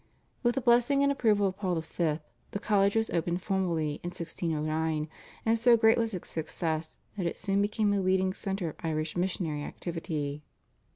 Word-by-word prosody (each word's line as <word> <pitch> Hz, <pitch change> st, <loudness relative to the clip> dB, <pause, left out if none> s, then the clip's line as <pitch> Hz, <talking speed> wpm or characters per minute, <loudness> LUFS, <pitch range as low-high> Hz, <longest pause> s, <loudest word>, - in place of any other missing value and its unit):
With 240 Hz, -1 st, +2 dB
the 270 Hz, -, 0 dB
blessing 245 Hz, +3 st, +4 dB
and 280 Hz, -, +4 dB
approval 215 Hz, -7 st, +3 dB
of 190 Hz, -1 st, -1 dB
Paul 185 Hz, -4 st, 0 dB
V. 160 Hz, -1 st, -1 dB, 0.3 s
the 200 Hz, -, -4 dB
college 200 Hz, -2 st, +2 dB
was 225 Hz, 0 st, +1 dB
opened 175 Hz, +2 st, -1 dB
formally 170 Hz, -7 st, 0 dB
in -, -, -5 dB
1609, 160 Hz, -2 st, -2 dB, 0.4 s
and 225 Hz, 0 st, +3 dB
so 235 Hz, 0 st, +6 dB
great 225 Hz, 0 st, +5 dB
was 225 Hz, -3 st, 0 dB
its 180 Hz, -, -6 dB
success 160 Hz, 0 st, -3 dB, 0.2 s
that 180 Hz, -3 st, 0 dB
it -, -, -3 dB
soon 200 Hz, 0 st, +1 dB
became 210 Hz, 0 st, +1 dB
the 200 Hz, -1 st, +2 dB
leading 185 Hz, 0 st, +2 dB
centre 195 Hz, -3 st, -3 dB
of -, -, -10 dB
Irish 155 Hz, -2 st, -2 dB
missionary 175 Hz, -4 st, -1 dB
activity. 155 Hz, -4 st, -4 dB
185 Hz, 175 wpm, -29 LUFS, 160-210 Hz, 0.4 s, so